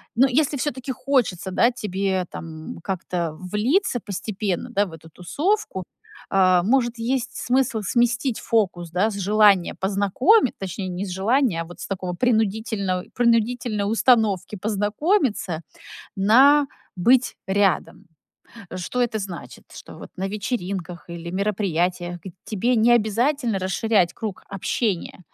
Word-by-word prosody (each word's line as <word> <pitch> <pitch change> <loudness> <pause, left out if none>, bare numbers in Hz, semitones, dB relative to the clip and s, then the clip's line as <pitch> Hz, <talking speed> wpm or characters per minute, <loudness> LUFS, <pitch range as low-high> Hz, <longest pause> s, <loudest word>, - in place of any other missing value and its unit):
ну, 260 +4 +5
если 285 +2 +1
всё-таки 260 -1 -3
хочется, 245 -9 0
да, 235 +6 +3
тебе 195 -4 -2
там 160 -1 -8
как-то 180 -3 -3
влиться 245 - 0
постепенно, 200 +1 -3
да, 205 -4 +1
в 175 - -11
эту 160 0 -12
тусовку, 240 - -2 0.5
э, 185 -2 +4
может, 240 +2 +1
есть 255 +2 -2 0.2
смысл 250 -4 +2
сместить 240 +3 +1
фокус, 180 -7 0
да, 180 +5 +2
с - - -6
желания 200 -2 +4
познакомит 205 - +3
точнее, 190 0 -5
не 180 +1 -5
с - - -6
желания, 205 0 +1
а - - -5
вот 175 +1 -13
с - - -6
такого 185 -2 -3
принудительного 220 -4 0
принудительной 235 -2 +1
установки 220 -4 +2
познакомиться 210 - 0 0.6
на 270 +9 +6 0.3
"быть 245 +8 +3
рядом". 195 0 0 0.7
Э, 185 - -5
что 185 +7 -4
это 235 -3 0
значит? 190 -4 -8
Что - - -11
вот - - -10
на 190 +1 -2
вечеринках 190 -5 -4
или 170 0 -7
мероприятиях 180 -3 -1
г 190 - -8
тебе 230 +4 0
не 235 +1 +5
обязательно 235 +2 +1
расширять 190 0 +1
круг 215 -4 -6
общения, 195 -1 -2
205 Hz, 135 wpm, -23 LUFS, 185-240 Hz, 0.7 s, на